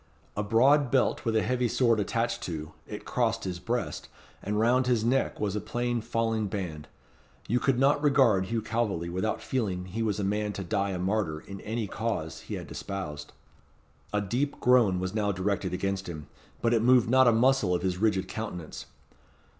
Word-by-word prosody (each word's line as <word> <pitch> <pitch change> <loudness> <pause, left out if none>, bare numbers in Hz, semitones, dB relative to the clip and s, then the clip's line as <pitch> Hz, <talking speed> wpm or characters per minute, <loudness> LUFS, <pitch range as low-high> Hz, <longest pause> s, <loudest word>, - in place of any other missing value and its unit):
A 105 - 0
broad 130 +7 +4
belt 130 0 +1
with 115 -1 +1
a 110 - +3
heavy 125 -1 +1
sword 115 -1 +2
attached 115 +3 -1
to, 80 -3 -5 0.2
it - - -7
crossed - - 0
his 90 -2 -4
breast, 120 +6 -3 0.3
and 105 +1 -1
round 125 +3 +3
his 120 -3 +2
neck 130 +3 +1
was 105 -1 -1
a 105 - -1
plain 120 -1 -2
falling 115 -1 -1
band. 90 -7 -5 0.6
You 120 +3 +2
could 135 0 +1
not 140 +3 +3
regard 130 -10 +4
Hugh 115 +2 -2
Calveley 100 -7 -1
without 95 +5 -2
feeling 95 -8 -2
he 100 +5 -4
was 105 -2 0
a - - -1
man 105 +1 -1
to 95 - -5
die 100 +1 0
a 95 - -2
martyr 90 -4 -1
in 100 -1 -9
any 115 +1 -3
cause 85 -7 -3
he - - -6
had - - -8
espoused. 75 -7 -6 0.8
A 105 - +1
deep 125 +8 -2
groan 120 -7 +4
was 95 +1 -3
now 105 -2 +1
directed 95 0 -1
against 95 0 -2
him. 75 -3 -7 0.4
But 115 0 +3
it 115 - +3
moved 125 0 +5
not 130 +2 +5
a - - +7
muscle 115 -5 +3
of 85 - -2
his 90 -1 -1
rigid 95 -3 +1
countenance. 90 -8 -6
105 Hz, 190 wpm, -28 LUFS, 95-120 Hz, 0.8 s, a